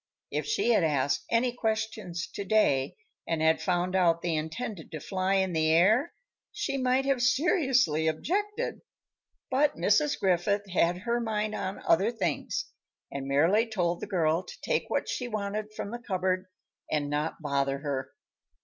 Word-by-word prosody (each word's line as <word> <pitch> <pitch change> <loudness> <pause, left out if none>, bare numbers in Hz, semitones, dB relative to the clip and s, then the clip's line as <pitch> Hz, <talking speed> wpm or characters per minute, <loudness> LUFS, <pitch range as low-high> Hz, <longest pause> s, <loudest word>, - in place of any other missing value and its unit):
If - - -2
she 425 - +1
had 215 -6 +4
asked 145 -3 +1
any 240 +1 +2
questions 220 -6 -2
to 200 - -4
day, 185 -10 +2 0.3
and 165 - 0
had 160 0 +3
found 180 0 0
out 170 -3 +3
they 170 -1 0
intended 160 +4 -4
to 155 - -5
fly 190 +3 -1
in 190 -2 +1
the 160 -1 +2
air, 215 - +4 0.4
she - - -2
might 255 +1 +2
have 275 -3 +1
seriously 260 - +2
objected; 415 - -2 0.7
but 285 +3 +2
Mrs. 210 - +2
Griffith 200 +2 +1
had 175 0 +2
her 235 +2 0
mind 215 -2 -1
on 190 -2 -4
other 190 +6 +4
things 485 - -2 0.5
and 135 -1 -5
merely 170 +12 +3
told 175 -6 -1
the - - -4
girl 165 -3 +1
to - - -11
take - - 0
what - - -1
she 250 - -3
wanted 210 -1 -3
from 200 - -5
the 240 - -5
cupboard 185 -4 -1 0.4
and 150 -2 0
not 150 +2 -2
bother 140 -2 0
her. 135 -2 -4
190 Hz, 160 wpm, -28 LUFS, 160-235 Hz, 0.7 s, had